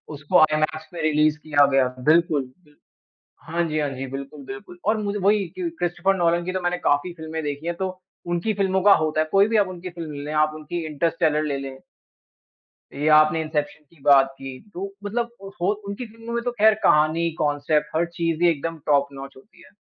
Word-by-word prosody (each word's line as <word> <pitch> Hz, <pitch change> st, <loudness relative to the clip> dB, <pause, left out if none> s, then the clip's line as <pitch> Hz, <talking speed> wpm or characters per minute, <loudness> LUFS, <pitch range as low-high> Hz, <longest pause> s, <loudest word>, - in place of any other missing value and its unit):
उसको 145 Hz, +5 st, +2 dB
आईमैक्स 155 Hz, 0 st, +1 dB
में 165 Hz, -, -5 dB
रिलीज़ 155 Hz, 0 st, +2 dB
किया 145 Hz, -2 st, +3 dB
गया 135 Hz, -1 st, +4 dB
था। 125 Hz, 0 st, -13 dB
बिल्कुल, 160 Hz, -1 st, +3 dB
बिल्कुल। 150 Hz, +3 st, -20 dB, 0.7 s
हाँ 170 Hz, +1 st, 0 dB
जी, 155 Hz, 0 st, -1 dB
हाँ 145 Hz, -1 st, 0 dB
जी। 130 Hz, +1 st, -5 dB
बिल्कुल, 140 Hz, +2 st, -8 dB
बिल्कुल। 200 Hz, -3 st, -10 dB
और 215 Hz, +1 st, +2 dB
मुझे 205 Hz, 0 st, -2 dB
वही 200 Hz, 0 st, +2 dB
क्रिस्टोफर 195 Hz, -, -1 dB
नोलन 170 Hz, -1 st, +1 dB
की 185 Hz, -, -3 dB
तो 185 Hz, -, -2 dB
मैंने 175 Hz, 0 st, 0 dB
काफ़ी 145 Hz, +2 st, 0 dB
फिल्में 160 Hz, -1 st, -6 dB
देखी 145 Hz, +2 st, -4 dB
हैं 170 Hz, -, -1 dB
तो 190 Hz, +2 st, -2 dB, 0.4 s
उनकी 175 Hz, +5 st, -1 dB
फ़िल्मों 190 Hz, -1 st, +1 dB
का 205 Hz, -1 st, +8 dB
होता 155 Hz, 0 st, 0 dB
है, 155 Hz, -, -1 dB
कोई 200 Hz, +1 st, +5 dB
भी 225 Hz, 0 st, +1 dB
आप 200 Hz, -2 st, +3 dB
उनकी 185 Hz, 0 st, -7 dB
फ़िल्म 165 Hz, -3 st, -7 dB
ले 150 Hz, -, -5 dB
आप 155 Hz, -, -6 dB
उनकी 160 Hz, +2 st, -5 dB
इंटरस्टेलर 155 Hz, 0 st, 0 dB
ले 140 Hz, -2 st, -2 dB
लें। 135 Hz, -1 st, -7 dB, 1.2 s
ये 145 Hz, +2 st, 0 dB
आपने 155 Hz, +1 st, +4 dB
इंसेप्शन 150 Hz, -1 st, -3 dB
की 160 Hz, -, -24 dB
बात 135 Hz, -2 st, +5 dB
की 135 Hz, -1 st, -8 dB, 0.2 s
तो 185 Hz, +2 st, -4 dB, 0.2 s
मतलब 235 Hz, +3 st, -2 dB, 0.3 s
होत 205 Hz, +4 st, 0 dB
उनकी 200 Hz, +5 st, -5 dB
फ़िल्मों 230 Hz, +1 st, -10 dB
में 235 Hz, -, -1 dB
तो 245 Hz, -, 0 dB
ख़ैर 220 Hz, -2 st, +4 dB
कहानी, 155 Hz, +2 st, +3 dB
कांसेप्ट 150 Hz, +1 st, +1 dB
हर 170 Hz, -, +3 dB
चीज़ 165 Hz, 0 st, -1 dB
ही 175 Hz, -, +6 dB
एकदम 165 Hz, +1 st, -3 dB
टॉप 140 Hz, -1 st, +3 dB
नॉच 135 Hz, 0 st, -9 dB
होती 135 Hz, -, -19 dB
है। -, -, -18 dB
160 Hz, 205 wpm, -23 LUFS, 150-185 Hz, 1.2 s, का